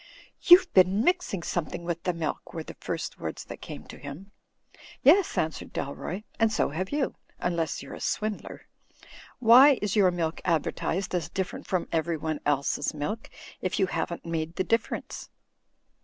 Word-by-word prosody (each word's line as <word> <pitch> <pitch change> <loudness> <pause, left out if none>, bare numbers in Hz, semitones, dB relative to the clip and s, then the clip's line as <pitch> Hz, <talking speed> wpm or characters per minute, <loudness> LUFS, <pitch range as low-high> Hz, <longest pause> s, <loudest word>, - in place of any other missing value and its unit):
''You've 360 +1 +9
been 190 +3 +5
mixing 355 - +1
something 175 0 -3
with 170 -1 -3
the 180 - +2
milk," 165 -2 -4
were 160 - -3
the - - -9
first - - -5
words - - -5
that - - -9
came - - -8
to - - -12
him. 155 +9 -9 0.7
"Yes," 350 +6 +5
answered 160 0 -2
Dalroy, 175 +8 -4 0.2
"and 225 -1 +4
so 215 - +1
have 185 +6 -3
you, 290 -2 0 0.2
unless 170 -3 -1
you're - - -9
a - - -8
swindler. 215 -1 -3 0.7
Why 255 +4 +8
is 205 0 -1
your 200 -3 +5
milk 170 -2 -2
advertised 180 +2 -1
as 170 -2 -1
different 190 0 -4
from 185 -2 -1
everyone 160 -2 -1
else's 145 +1 0
milk, 205 +10 -4 0.3
if 185 - -1
you 190 - +4
haven't 175 -1 -3
made 165 0 -3
the 185 - 0
difference 230 +3 -2
180 Hz, 160 wpm, -27 LUFS, 160-215 Hz, 0.7 s, You've